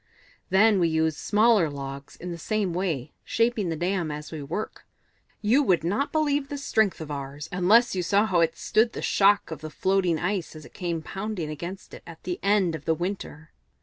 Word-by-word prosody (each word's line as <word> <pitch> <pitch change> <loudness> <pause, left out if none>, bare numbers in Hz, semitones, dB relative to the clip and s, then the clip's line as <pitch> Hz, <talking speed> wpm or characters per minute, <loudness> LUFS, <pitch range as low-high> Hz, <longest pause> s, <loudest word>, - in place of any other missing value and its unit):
"Then 200 +2 +5
we 170 - +3
use 160 -1 +1
smaller 210 -2 +3
logs 140 -1 -7
in 180 +1 -7
the 170 - -5
same 205 0 -1
way, 165 -7 -2
shaping 230 -5 0
the 165 - -1
dam 175 0 -1
as 150 0 -6
we 155 -2 -5
work. 170 +10 -5 0.6
You 235 +7 +4
would 185 - +2
not 205 - 0
believe 290 -3 +1
the 285 - -4
strength 220 -10 +1
of 155 -1 -6
ours, 140 +1 -6
unless 205 +7 +4
you 185 - 0
saw 200 +5 +3
how 185 -5 +1
it 165 -1 +2
stood 220 +8 +2
the - - -5
shock 200 -2 +3
of 160 - -6
the 155 - -6
floating 185 0 +1
ice 180 -1 -2
as 155 - -10
it - - -15
came 170 -3 -3
pounding 195 -4 -4
against 175 +5 -7
it - - -9
at 165 -1 -12
the 180 -1 -3
end 200 -4 +2
of 155 -2 -7
the 160 - +2
winter. 175 -3 -5
180 Hz, 205 wpm, -26 LUFS, 160-210 Hz, 0.6 s, Then